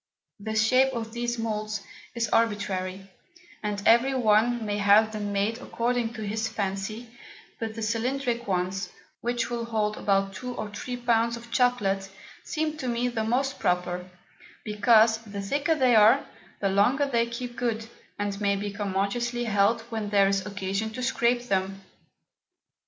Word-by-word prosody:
The 220 +2 -4
Shape 255 +5 +4
of 225 -2 -4
these 240 0 -2
Moulds 215 -2 -3 0.3
is 230 -1 0
arbitrary, 195 -4 -1 0.5
and 205 -1 -3
every 245 +4 +5
one 230 0 +3
may 205 0 -1
have 205 +2 +5
them 210 -1 -3
made 205 +4 0
according 240 -2 -1
to 220 -2 -6
his 220 +2 -1
Fancy; 215 +4 -4 0.4
but 220 -1 -4
the 225 - -4
cylindrick 240 +2 -1
ones, 185 +1 -1 0.3
which 240 0 -2
will 235 -1 -2
hold 215 -2 -1
about 195 -1 +1
2 245 +6 -6
or 215 -1 -5
3 245 +4 -5
Pounds 235 -1 +1
of 235 0 -13
Chocolate, 200 -7 +1 0.3
seem 310 0 -2
to 265 -4 -4
me 245 +1 0
to 230 -2 -2
be 220 - -2
most 270 +4 0
proper; 180 0 -1 0.5
because 220 +1 +4
the 205 -3 -8
thicker 285 +10 0
they 255 -5 +4
are, 215 +1 +6 0.4
the 200 - +2
longer 225 +9 +3
they 235 -4 +1
keep 240 +1 -6
good, 225 -3 -2 0.3
and 205 0 -3
may 200 -1 +2
be 205 +1 -3
commodiously 205 +4 -1
held 215 +1 +2
when 220 -2 -3
there 200 -1 +4
is 195 0 +1
occasion 200 +1 -2
to 255 - -5
scrape 245 -1 +1
them. 195 -3 -1
220 Hz, 160 wpm, -27 LUFS, 200-240 Hz, 0.5 s, are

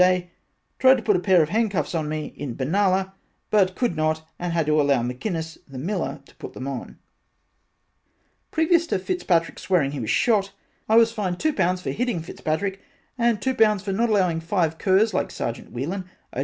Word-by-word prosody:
Day 185 0 +5
that 175 -1 -21
tried 260 -1 +7
to 235 - -6
put 210 -1 +3
a - - +2
pair 180 -2 +4
of 150 - -3
hand 220 +4 +1
cuffs 180 -6 -2
on 155 -3 -1
me 155 0 -4
in 135 -5 -5
Benalla 190 +6 +1 0.4
but 190 -3 +3
could 240 -9 0
not 155 0 -1
and 175 0 -2
had 165 -2 +1
to 155 0 +3
allow 140 -4 +2
McInnis 160 - -4
the 135 -2 -10
miller 170 0 -3
to - - -20
put - - -8
them 130 - -6
on, 135 -3 -6 1.5
previous 335 +1 +2
to 285 - 0
Fitzpatrick 185 - 0
swear 180 -5 +2
ing 135 - -2
he 145 - -5
was 110 -3 -4
shot, 200 - +2 0.4
I 220 - +4
was 230 0 +6
fined 195 -6 -3
two 310 -1 +1
pounds 180 -3 0
for - - -2
hitting 240 -8 -1
Fitzpatrick 190 +5 -3 0.3
and 235 -3 +1
two 260 +5 0
pounds 215 -4 +3
for 200 - -3
not 230 +4 +1
allowing 185 -6 +2
five 165 -1 -1
curs 200 +3 +3
like - - 0
Sergeant 115 - -5
Whelan 180 +9 -4 0.2
O. - - -4
185 Hz, 205 wpm, -24 LUFS, 155-210 Hz, 1.5 s, tried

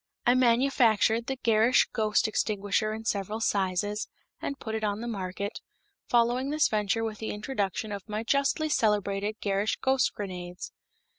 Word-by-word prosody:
I 245 - +5
manufactured 235 -3 +3
the 265 - -2
Gerrish 225 +2 +4
Ghost 215 0 +2
Extinguisher 215 0 0
in 220 +1 -6
several 210 0 -2
sizes, 205 0 0 0.3
and 280 - -3
put 220 - -6
it 220 0 -2
on 205 0 -1
the 235 - -5
market, 200 -1 -4 0.5
following 245 +3 +2
this 305 +1 +2
venture 215 +1 0
with 220 -2 -4
the 220 - -4
introduction 210 -1 -3
of 200 +1 -7
my 215 +1 -2
justly 280 +5 +1
celebrated 210 -5 +1
Gerrish 200 +1 0
Ghost 265 -1 +1
Grenades. 180 -3 -6
215 Hz, 150 wpm, -28 LUFS, 205-235 Hz, 0.5 s, I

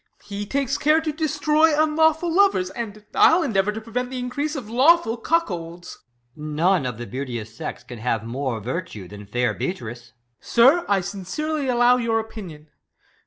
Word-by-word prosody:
He 205 0 -6
takes 275 0 -1
care 305 +2 +4
to 320 -1 -2
destroy 310 0 +2
unlawful 315 +2 +2
lovers; 350 - +3
And 215 -2 -7
I'll 335 +2 +5
endeavour 210 -7 +1
to 215 - -5
prevent 245 +3 -4
th' 260 - -7
increase 255 +5 -3
Of 255 -7 -6
lawful 260 +2 +4
cuckolds. 175 - -3
EscH. - - -34 0.4
None 155 +1 +1
of 125 -3 -5
the 120 - -6
beauteous 120 -4 -6
sex - - -6
can 120 -2 -10
have 115 -1 -1
more 125 0 -3
virtue. 120 - -5
Than 105 +1 -11
fair 120 +1 0
Beatrice. 120 - -5
Ben. 120 - -23 0.3
Sir, 270 +9 +4
I 200 -1 +3
sincerely 265 - -3
allow 245 0 +4
your 230 -2 0
opinion. 185 -9 -9
215 Hz, 165 wpm, -23 LUFS, -, 0.4 s, I'll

